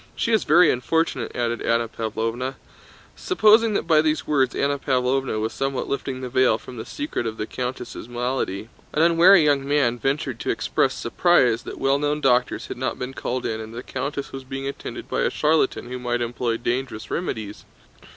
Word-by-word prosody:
She 230 Hz, -, -1 dB
is 220 Hz, -, +2 dB
very 165 Hz, +1 st, +6 dB
unfortunate!" 130 Hz, -1 st, -1 dB
added 120 Hz, -1 st, -1 dB
Anna 115 Hz, 0 st, +1 dB
Pávlovna. 115 Hz, +4 st, -3 dB, 0.6 s
Supposing 220 Hz, -, +4 dB
that -, -, 0 dB
by 160 Hz, -2 st, +5 dB
these 155 Hz, 0 st, 0 dB
words 135 Hz, -4 st, +1 dB
Anna 140 Hz, 0 st, 0 dB
Pávlovna 130 Hz, -3 st, 0 dB
was 110 Hz, +1 st, -2 dB
somewhat 135 Hz, -1 st, -2 dB
lifting 135 Hz, -2 st, -3 dB
the 130 Hz, -, -4 dB
veil 130 Hz, -3 st, +3 dB
from 125 Hz, +2 st, -11 dB
the 110 Hz, -, -7 dB
secret 295 Hz, -, -3 dB
of 110 Hz, 0 st, -5 dB
the 105 Hz, -, -2 dB
countess' 125 Hz, -1 st, -5 dB
malady, 120 Hz, -4 st, -3 dB, 0.2 s
an 155 Hz, -, +3 dB
unwary 170 Hz, +2 st, +6 dB
young 145 Hz, -2 st, +3 dB
man 140 Hz, -5 st, +2 dB
ventured 135 Hz, -1 st, -1 dB
to -, -, -4 dB
express -, -, +1 dB
surprise 125 Hz, -4 st, +2 dB
that -, -, -8 dB
well 135 Hz, +1 st, +2 dB
known 145 Hz, +1 st, 0 dB
doctors 125 Hz, -3 st, +2 dB
had -, -, -7 dB
not 130 Hz, +1 st, -2 dB
been 125 Hz, +1 st, -5 dB
called 125 Hz, -1 st, -3 dB
in 110 Hz, 0 st, -2 dB
and 110 Hz, +1 st, -9 dB
that 120 Hz, -, -7 dB
the -, -, -15 dB
countess 140 Hz, 0 st, -3 dB
was 135 Hz, 0 st, -7 dB
being 135 Hz, +1 st, -5 dB
attended 140 Hz, -, -6 dB
by -, -, -1 dB
a -, -, +2 dB
charlatan 150 Hz, -5 st, +1 dB
who 125 Hz, +1 st, -5 dB
might 120 Hz, -1 st, -1 dB
employ 120 Hz, -1 st, -1 dB
dangerous 120 Hz, -1 st, -3 dB
remedies. 110 Hz, -, -4 dB
130 Hz, 190 wpm, -23 LUFS, 120-145 Hz, 0.6 s, very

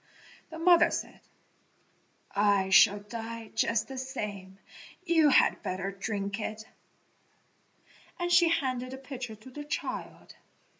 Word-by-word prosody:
The 320 Hz, -, -8 dB
mother 340 Hz, 0 st, +5 dB
said, -, -, -5 dB, 1.2 s
"I 200 Hz, -2 st, +2 dB
shall 205 Hz, +1 st, +6 dB
die 225 Hz, +1 st, -7 dB
just 225 Hz, -1 st, +1 dB
the 265 Hz, -1 st, -6 dB
same; 205 Hz, -8 st, -6 dB, 0.5 s
you 325 Hz, -4 st, +4 dB
had -, -, +4 dB
better 185 Hz, +1 st, -3 dB
drink 200 Hz, +1 st, -4 dB
it," 215 Hz, 0 st, -5 dB, 1.5 s
and 350 Hz, -1 st, -2 dB
she 345 Hz, -1 st, +6 dB
handed 255 Hz, -6 st, -1 dB
the -, -, -6 dB
pitcher 255 Hz, -4 st, -7 dB
to 215 Hz, +5 st, -15 dB
the 295 Hz, +3 st, -7 dB
child. 300 Hz, +3 st, -5 dB
230 Hz, 120 wpm, -29 LUFS, 205-285 Hz, 1.5 s, shall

